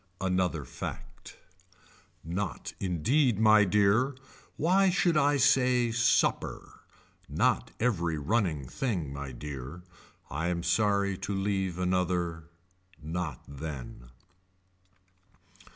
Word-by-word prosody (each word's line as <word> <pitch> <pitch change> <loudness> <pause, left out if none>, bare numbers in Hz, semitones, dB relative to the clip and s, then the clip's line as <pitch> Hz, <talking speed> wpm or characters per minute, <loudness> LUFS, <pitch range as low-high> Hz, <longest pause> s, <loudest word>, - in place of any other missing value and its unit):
Another 90 -5 0
fact. - - -8 0.9
Not 85 +2 -4
indeed 110 - +1
my 110 -1 +6
dear. 105 +7 +3 0.4
Why 190 +4 +3
should 175 -2 +2
I 145 -1 +3
say 125 -2 +3
supper. 120 0 0 0.5
Not - - +1
every 85 -9 0
running 80 - 0
thing 90 - -3
my 70 -1 -6
dear. 70 +5 -7 0.4
I 85 - -3
am 85 -1 -1
sorry 100 +2 +1
to 100 - -3
leave 95 -2 -1
another. 90 -2 -1 0.5
Not 80 -4 -4
then. 70 -4 -8
95 Hz, 95 wpm, -29 LUFS, 80-115 Hz, 0.9 s, my